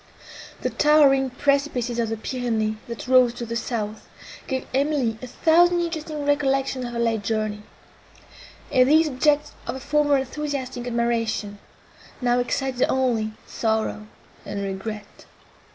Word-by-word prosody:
The -, -, -1 dB
towering 280 Hz, -3 st, +4 dB
precipices 260 Hz, -3 st, 0 dB
of 230 Hz, -2 st, 0 dB
the 225 Hz, -, -2 dB
Pyrenees, 220 Hz, -2 st, -2 dB
that 235 Hz, +1 st, -7 dB
rose 250 Hz, -2 st, +5 dB
to 240 Hz, -, -5 dB
the 230 Hz, 0 st, -4 dB
south, 220 Hz, -2 st, -4 dB, 0.4 s
gave 260 Hz, -1 st, -2 dB
Emily 270 Hz, -5 st, +1 dB
a 255 Hz, -, -6 dB
thousand 345 Hz, +6 st, +4 dB
interesting 315 Hz, -3 st, -3 dB
recollections 270 Hz, -2 st, +1 dB
of 240 Hz, -, -6 dB
her -, -, -4 dB
late 230 Hz, -2 st, +1 dB
journey; 215 Hz, 0 st, -2 dB, 1.1 s
and 255 Hz, -2 st, +4 dB
these 315 Hz, +2 st, +5 dB
objects 295 Hz, +2 st, +1 dB, 0.2 s
of -, -, -3 dB
her -, -, -6 dB
former 290 Hz, +1 st, +2 dB
enthusiastic 265 Hz, -2 st, -4 dB
admiration, 230 Hz, -3 st, -1 dB, 0.6 s
now 245 Hz, -1 st, +2 dB
excited 255 Hz, +1 st, -1 dB
only 235 Hz, -5 st, +1 dB
sorrow 220 Hz, -1 st, -2 dB, 0.4 s
and 200 Hz, 0 st, -4 dB
regret. 200 Hz, +2 st, -6 dB
250 Hz, 135 wpm, -24 LUFS, 225-280 Hz, 1.1 s, rose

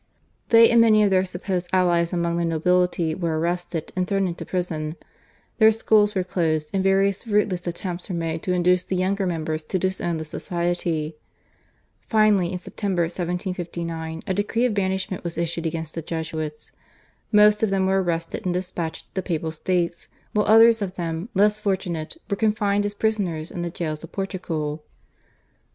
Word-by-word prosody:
They 230 Hz, 0 st, +8 dB
and 235 Hz, -1 st, +6 dB
many 215 Hz, -2 st, +5 dB
of 200 Hz, -, +3 dB
their 185 Hz, 0 st, +3 dB
supposed 180 Hz, 0 st, -3 dB
allies 175 Hz, -2 st, +2 dB
among 170 Hz, -1 st, 0 dB
the 170 Hz, -, 0 dB
nobility 170 Hz, 0 st, +1 dB
were 165 Hz, -2 st, -1 dB
arrested 175 Hz, 0 st, -2 dB
and 185 Hz, -1 st, 0 dB
thrown 195 Hz, 0 st, +1 dB
into 170 Hz, -1 st, -5 dB
prison; 160 Hz, -4 st, -2 dB, 0.6 s
their 220 Hz, 0 st, +7 dB
schools 215 Hz, -1 st, +3 dB
were 185 Hz, -, +1 dB
closed, 160 Hz, -4 st, -1 dB
and 190 Hz, -1 st, +1 dB
various 195 Hz, +1 st, +2 dB
fruitless 205 Hz, -5 st, 0 dB
attempts 175 Hz, +1 st, -4 dB
were 180 Hz, -, -2 dB
made 165 Hz, -1 st, -2 dB
to 185 Hz, -, -2 dB
induce 180 Hz, 0 st, +3 dB
the 190 Hz, -, -3 dB
younger 190 Hz, +1 st, 0 dB
members 160 Hz, -2 st, -2 dB
to 185 Hz, -, -1 dB
disown 180 Hz, -2 st, -1 dB
the 160 Hz, -, -5 dB
Society. 170 Hz, -2 st, -2 dB, 0.9 s
Finally 210 Hz, -5 st, +3 dB
in 185 Hz, -, -2 dB
September 185 Hz, -1 st, -2 dB
1759 170 Hz, -2 st, -4 dB
a 190 Hz, -, -1 dB
decree 210 Hz, +5 st, 0 dB
of 245 Hz, -, +1 dB
banishment 190 Hz, -2 st, -1 dB
was 170 Hz, -2 st, -5 dB
issued 170 Hz, 0 st, -1 dB
against 160 Hz, -1 st, -4 dB
the 165 Hz, -, -4 dB
Jesuits. 155 Hz, -1 st, -5 dB, 0.6 s
Most 210 Hz, -1 st, +6 dB
of 220 Hz, -, +2 dB
them 195 Hz, -1 st, +1 dB
were 190 Hz, 0 st, +2 dB
arrested 165 Hz, -2 st, -2 dB
and 180 Hz, -1 st, -1 dB
despatched 180 Hz, -3 st, -4 dB
to -, -, -42 dB
the 190 Hz, -, -1 dB
Papal 165 Hz, -3 st, -2 dB
States, 170 Hz, +1 st, -1 dB, 0.3 s
while 210 Hz, 0 st, +1 dB
others 225 Hz, +1 st, +7 dB
of 190 Hz, -2 st, -3 dB
them, 170 Hz, +3 st, -4 dB
less 210 Hz, +2 st, +3 dB
fortunate, 190 Hz, -, -2 dB
were 200 Hz, -, -1 dB
confined 205 Hz, -1 st, +1 dB
as 205 Hz, -, -5 dB
prisoners 195 Hz, -8 st, -1 dB
in 175 Hz, -, -5 dB
the 175 Hz, -, -2 dB
jails 155 Hz, -2 st, -4 dB
of 165 Hz, -, -10 dB
Portugal. 165 Hz, -6 st, -3 dB
180 Hz, 170 wpm, -24 LUFS, 165-195 Hz, 0.9 s, They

